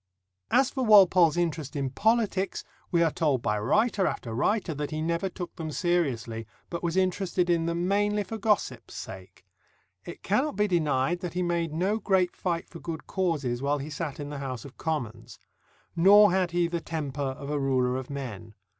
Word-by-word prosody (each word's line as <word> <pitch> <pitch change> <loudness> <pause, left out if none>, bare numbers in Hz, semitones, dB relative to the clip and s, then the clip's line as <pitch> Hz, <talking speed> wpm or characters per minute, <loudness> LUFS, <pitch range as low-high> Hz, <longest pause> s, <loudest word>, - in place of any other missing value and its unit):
As 265 +1 +3
for 265 - -2
Walpole's 185 -7 +6
interest 160 -4 -2
in 135 -2 -2
politics, 205 - +1 0.3
we 170 -1 +3
are 165 - +2
told 145 -7 0
by 105 -1 0
writer 210 - +2
after 115 - -4
writer 180 - 0
that 145 0 -4
he 155 - -4
never 170 +4 -1
took 180 -1 -7
them 160 -1 -4
seriously, 130 -11 -1 0.2
but 170 - -3
was 170 +1 -1
interested 185 -1 +1
in 165 -1 +1
them 170 +1 -1
mainly 205 +1 +1
for 220 +2 -6
gossip's 210 0 -1
sake. - - -9 0.6
It - - -10
cannot 295 -1 +1
be 210 +1 +2
denied 160 -2 +1
that 180 -2 -6
he 180 - 0
made 170 -2 -1
no 190 +7 0
great 190 -4 +1
fight 170 -2 -2
for 170 - -11
good 160 -2 -6
causes 150 -10 -1
while 140 +1 +1
he 145 +2 -6
sat 150 -2 -4
in 145 0 -5
the 145 - -5
House 130 -4 -5
of 140 - -11
Commons. 120 -7 -4 0.6
Nor 205 +4 +7
had 185 -1 +1
he 175 0 +1
the 170 0 -3
temper 145 -4 -4
of 140 +1 -4
a 150 - 0
ruler 130 -2 +1
of 130 -1 -5
men. 115 -7 -7
170 Hz, 190 wpm, -27 LUFS, 140-185 Hz, 0.6 s, Nor